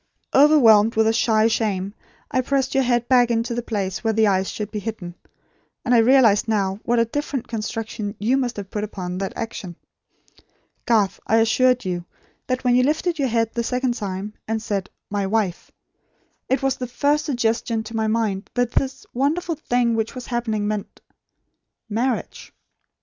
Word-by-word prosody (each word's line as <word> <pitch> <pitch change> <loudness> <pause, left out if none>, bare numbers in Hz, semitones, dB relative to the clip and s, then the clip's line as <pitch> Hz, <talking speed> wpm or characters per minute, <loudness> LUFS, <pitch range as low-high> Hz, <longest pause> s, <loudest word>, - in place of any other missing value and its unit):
Overwhelmed 235 -7 +6
with 220 0 +3
a 225 - +3
shy 220 -1 +3
shame 205 -4 -1 0.4
I 255 - +2
pressed 265 0 0
your 270 -1 +3
head 240 -1 +1
back 250 -2 +5
to 230 0 -1
the 240 - -2
place 200 -5 -3
where 225 -1 +1
the 220 0 +3
eyes 190 -2 0
would 210 -1 -4
be 210 - -3
hidden; 200 -5 -6 0.7
and 250 - +2
I 240 - +6
realise 230 -3 +5
now 200 -3 0
what 240 +1 +1
a 230 - +4
different 275 +1 -3
construction 220 -2 -4
you 230 +6 +1
must 250 -4 -1
have 200 -1 -7
put 210 - -3
upon 185 -3 -5
that 195 - -3
action. 215 -6 -6 1.1
Garth, 210 -4 +2
I 225 - +3
assure 250 +3 +4
you, 175 -2 -3 0.4
that 255 0 -1
when 245 -1 +3
you 250 - +5
lifted 315 +5 0
your 275 - +2
head 230 -1 0
the 235 - -1
second 250 +1 0
time, 205 -2 -5
and 220 0 -1
said, 200 -3 -3 0.2
'My 200 -1 -1
wife,' 200 -4 -1 0.8
it 265 +1 +1
was 270 -1 +1
the 250 - -4
first 290 +5 +1
suggestion 230 -4 0
to 225 +1 -8
my 220 -1 0
mind 215 -3 -1
that 245 -1 +1
this 270 +1 -1
wonderful 310 +7 0
thing 245 -6 0
which 225 +3 -2
was 255 - -7
happening 225 -4 -2
meant 210 -1 -4 0.9
marriage. 235 +3 -2
225 Hz, 175 wpm, -22 LUFS, 210-250 Hz, 1.1 s, Overwhelmed